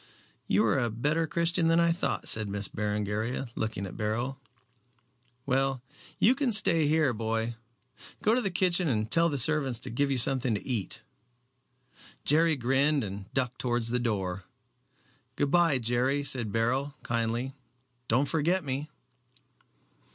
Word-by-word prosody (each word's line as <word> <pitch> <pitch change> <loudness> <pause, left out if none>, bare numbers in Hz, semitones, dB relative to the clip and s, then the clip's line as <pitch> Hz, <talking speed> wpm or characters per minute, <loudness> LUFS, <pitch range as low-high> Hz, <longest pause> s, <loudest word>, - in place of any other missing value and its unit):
"You 105 +4 +3
are 115 +4 +2
a 120 -2 0
better 150 +9 -1
Christian 170 +1 +1
than 165 +1 +3
I 170 0 +3
thought," 170 - -2
said 110 -2 -1
Miss 100 0 -3
Berengaria, 105 +4 -3
looking 110 -4 -3
at 95 - -8
Beryl. 120 +5 -2 1.1
"Well, 135 -1 0 0.3
you 235 - +5
can 265 -2 -1
stay 165 -8 +4
here, 155 -4 +2
boy. 115 +1 -2 0.7
Go 215 - +3
to 250 - +2
the 200 - -1
kitchen 180 -1 +1
and 110 -4 -1
tell 170 0 +4
the 145 - -2
servants 135 -2 +3
to - - -8
give 140 +4 0
you 135 - 0
something 125 -1 +4
to 100 - -6
eat." 120 -8 -4 1.2
Jerry 160 +2 +3
grinned, 135 +3 +1
and 100 -1 -7
ducked 125 -1 -1
towards 120 -2 +1
the 125 - +1
door. 100 -5 -2 0.9
"Good 140 +1 0
bye, 170 -5 +4
Jerry," 125 +4 0
said 125 -6 0
Beryl, 130 +6 -1
kindly. 115 +3 -2 0.5
"Don't 130 +5 +2
forget 165 +5 +1
me." 140 +2 -4
130 Hz, 150 wpm, -28 LUFS, 115-155 Hz, 1.2 s, you